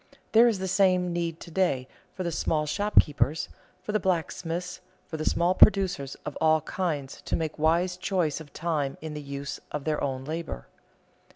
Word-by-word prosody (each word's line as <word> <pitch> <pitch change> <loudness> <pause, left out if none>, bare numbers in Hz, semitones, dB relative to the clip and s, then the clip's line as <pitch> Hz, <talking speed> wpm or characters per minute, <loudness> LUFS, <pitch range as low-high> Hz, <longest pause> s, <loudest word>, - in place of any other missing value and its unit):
There 230 +2 +7
is 225 -4 +2
the 190 0 -3
same 185 -2 +3
need 170 -1 -2
to 170 - -10
day 160 -8 +1 0.3
for 185 - -3
the 170 - -1
small 155 -1 0
shopkeepers, 155 -4 +2 0.3
for - - -3
the 215 - +2
blacksmiths, 175 0 -2 0.2
for - - -7
the 155 - -3
small 175 +2 +2
producers 185 -10 +4
of 150 - -5
all 160 0 +4
kinds 150 -5 -3
to - - -1
make 160 -2 -3
wise 170 +3 +2
choice 180 -5 0
of 145 -3 -12
time 155 -5 -2
in 160 -1 -5
the 150 - -5
use 140 0 -5
of 150 - -3
their 155 0 -1
own 135 -1 -2
labor. 160 - -5
165 Hz, 180 wpm, -27 LUFS, 150-185 Hz, 0.3 s, There